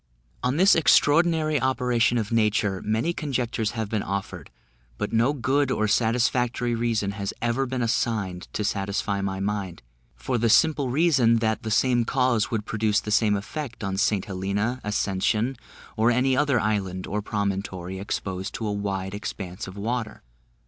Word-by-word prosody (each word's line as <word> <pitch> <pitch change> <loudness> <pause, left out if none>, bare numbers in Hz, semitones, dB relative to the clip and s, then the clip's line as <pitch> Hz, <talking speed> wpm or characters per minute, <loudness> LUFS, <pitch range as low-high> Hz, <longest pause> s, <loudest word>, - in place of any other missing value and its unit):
On 125 +3 0
this 190 +3 +6
extraordinary 155 -1 +3
operation 125 -2 +2
of 110 -2 -2
nature, 105 -4 +1
many 110 +11 0
conjectures 125 -8 -2
have 110 -2 -1
been 105 0 -1
offered, 95 -5 -5 0.5
but - - -3
no 115 +4 +3
good 140 0 +1
or 110 -4 +1
satisfactory 120 +2 +1
reason 115 -4 0
has 100 -1 -4
ever 120 +3 0
been 125 -1 -2
assigned 110 -6 -1
to 105 - -2
satisfy 100 0 -1
my 95 -1 -2
mind; 100 -5 -3 0.3
for 60 - -2
the 115 +1 +2
simple 145 +1 +4
reason, 135 -5 +3
that 110 0 0
the 110 - -4
same 120 +2 +3
causes 120 -2 +1
would 110 -2 -2
produce 105 -1 +1
the 105 - -6
same 105 -1 +3
effect 120 +4 -5
on 100 -1 -2
St 105 -1 +1
Helena, 100 +6 -2
Ascension, 105 +4 0 0.4
or 115 +1 +3
any 130 +2 +2
other 140 -2 +2
island 95 -4 -1
or 105 +2 -2
promontory 95 -3 -3
exposed 95 -1 -4
to 110 - -4
a 105 - -1
wide 95 -2 -3
expanse 95 -1 -6
of 95 +2 -9
water. 115 +2 -3
110 Hz, 160 wpm, -25 LUFS, 100-125 Hz, 0.5 s, this